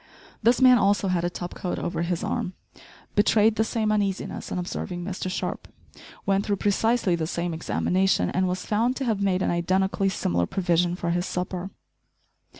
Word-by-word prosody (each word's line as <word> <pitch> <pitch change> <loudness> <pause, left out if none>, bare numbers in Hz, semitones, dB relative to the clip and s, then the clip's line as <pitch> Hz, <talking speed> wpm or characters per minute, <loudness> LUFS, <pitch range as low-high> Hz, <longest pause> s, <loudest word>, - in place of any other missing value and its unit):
This 235 +4 +4
man 250 -2 +8
also 200 -1 +2
had 175 -2 +1
a 175 - +1
top 175 0 -6
coat 180 - -3
over 170 - -2
his 170 +2 -1
arm, 215 -3 -2 0.6
betrayed 215 +1 +4
the 220 - +2
same 220 -1 0
uneasiness 200 -3 -2
on - - -2
observing 175 0 -4
Mr 185 0 -4
Sharp, - - -4 0.6
went 195 0 +1
though 205 - +2
precisely 205 0 +1
the 165 -2 -1
same 170 0 -2
examination, 185 +4 +1
and 185 +1 +1
was 180 0 -3
found 230 +4 +1
to 270 - -3
have 220 -4 0
made 190 -2 +1
an - - +1
identically 190 +3 +1
similar 85 - 0
provision 175 -1 +1
for 175 -2 -2
his 175 +1 -1
supper. 180 +1 -3
190 Hz, 175 wpm, -25 LUFS, 175-210 Hz, 0.6 s, man